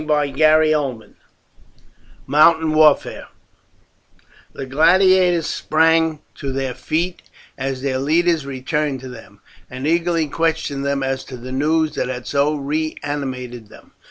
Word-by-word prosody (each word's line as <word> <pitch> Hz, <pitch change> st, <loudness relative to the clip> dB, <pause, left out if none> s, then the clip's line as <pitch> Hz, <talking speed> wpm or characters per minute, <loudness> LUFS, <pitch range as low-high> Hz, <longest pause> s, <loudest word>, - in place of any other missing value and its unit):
CHAPTER 150 Hz, -2 st, -1 dB
XX: 155 Hz, -6 st, +2 dB, 1.1 s
MOUNTAIN 160 Hz, +2 st, +4 dB
WARFARE 155 Hz, -1 st, +3 dB, 1.3 s
The 135 Hz, -, -6 dB
gladiators 175 Hz, +4 st, +3 dB
sprang 160 Hz, 0 st, +1 dB
to 140 Hz, -, -6 dB
their 135 Hz, -1 st, -3 dB
feet 170 Hz, +6 st, -3 dB, 0.3 s
as 135 Hz, -1 st, -4 dB
their 130 Hz, -2 st, -1 dB
leaders 165 Hz, +3 st, +1 dB
returned 140 Hz, +1 st, -3 dB
to 130 Hz, -, -8 dB
them, 105 Hz, -4 st, -13 dB, 0.3 s
and 130 Hz, +2 st, -7 dB
eagerly 165 Hz, 0 st, +1 dB
questioned 160 Hz, -3 st, -2 dB
them 140 Hz, -1 st, -1 dB
as 135 Hz, 0 st, -2 dB
to 130 Hz, -, -9 dB
the 125 Hz, +2 st, -9 dB
news 155 Hz, +3 st, 0 dB
that -, -, -2 dB
had 125 Hz, -1 st, -5 dB
so 145 Hz, +2 st, +1 dB
reanimated 140 Hz, -5 st, -4 dB
them. -, -, -17 dB
145 Hz, 125 wpm, -19 LUFS, 135-160 Hz, 1.3 s, MOUNTAIN